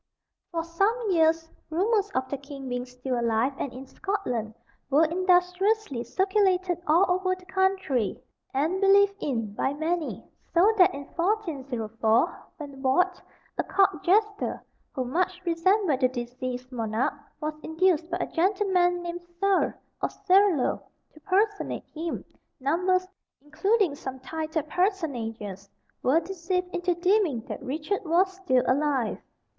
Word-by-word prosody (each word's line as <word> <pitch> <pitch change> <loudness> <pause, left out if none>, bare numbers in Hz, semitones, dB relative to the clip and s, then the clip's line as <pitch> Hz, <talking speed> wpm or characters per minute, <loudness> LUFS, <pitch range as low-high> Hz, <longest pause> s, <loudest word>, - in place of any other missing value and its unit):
For 330 -2 -1
some 400 +7 0
years 325 -1 +2 0.2
rumours 405 +5 +1
of 260 0 0
the 280 - -3
king 275 -1 -9
being 245 0 -3
still 250 0 -3
alive 235 +3 +1
and 275 - -2
in 255 +2 -9
Scotland 260 - -3 0.3
were 295 +4 +5
industriously 360 - +2
circulated 375 - +1
all 335 +5 +5
over 370 +1 +1
the 370 0 -17
country, 380 - 0 0.3
and 320 +8 0
believed 395 0 +5
in 225 -7 -2
by 265 +6 0
many; 320 +1 -2 0.3
so 390 +6 +6
that 360 -6 +6
in 280 - -6
1404, 265 - 0 0.2
when 280 -3 -9
Warde, 360 +8 +2 0.4
a - - +3
Court 390 -1 +2
jester, 415 +2 +1 0.3
who 255 - -2
much 360 +7 0
resembled 340 -2 +2
the 255 - +4
deceased 250 +1 -5
monarch, 225 -1 -1 0.3
was 305 0 -2
induced 330 +1 +1
by 350 - -1
a - - +1
gentleman 360 -1 +2
named 345 0 -5 0.2
Serle, 395 0 +3 0.3
or - - +1
Serlo, 385 -7 +3 0.3
to 310 - -16
personate 405 +5 0
him, 325 +1 -4 0.3
numbers, 365 +7 +1 0.3
including 335 - +1
some 265 -2 -7
titled 315 +3 -3
personages, 230 - -2 0.3
were 275 +6 +4
deceived 360 +1 -3
into 355 0 0
deeming 355 - +2
that 235 - -7
Richard 305 +10 -2
was 365 +3 +2
still 275 -10 +1
alive. 270 -4 +1
330 Hz, 135 wpm, -27 LUFS, 265-375 Hz, 0.4 s, so